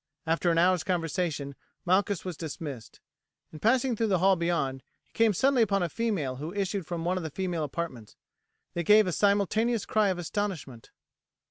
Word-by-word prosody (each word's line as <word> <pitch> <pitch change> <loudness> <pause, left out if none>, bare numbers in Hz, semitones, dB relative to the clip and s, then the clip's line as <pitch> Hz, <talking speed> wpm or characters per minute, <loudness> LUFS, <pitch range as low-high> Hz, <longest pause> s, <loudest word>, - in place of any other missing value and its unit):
After 165 +2 +1
an 165 - +2
hour's 180 0 +3
conversation 165 -5 -2 0.3
Malchus 190 +1 +1
was 180 -2 -4
dismissed. 145 -6 -7 0.5
In 155 - -9
passing 250 - +2
through 225 +1 0
the 190 -3 +2
hall 190 +2 +4
beyond 170 -6 -1 0.2
he - - -38
came 225 -1 +4
suddenly 260 +6 +2
upon 200 -4 +2
a 175 - -1
female 185 - -2
who 155 +5 -5
issued 195 -3 -2
from 170 -2 -4
one 180 +1 +1
of 180 - -3
the 160 - -4
female 175 0 -2
apartments. 135 -7 -5 0.6
They 175 - -1
gave 210 +5 +6
a 180 - -1
simultaneous 205 +4 +1
cry 215 -2 +2
of 185 - -1
astonishment. 175 - -4
180 Hz, 175 wpm, -28 LUFS, 160-205 Hz, 0.6 s, gave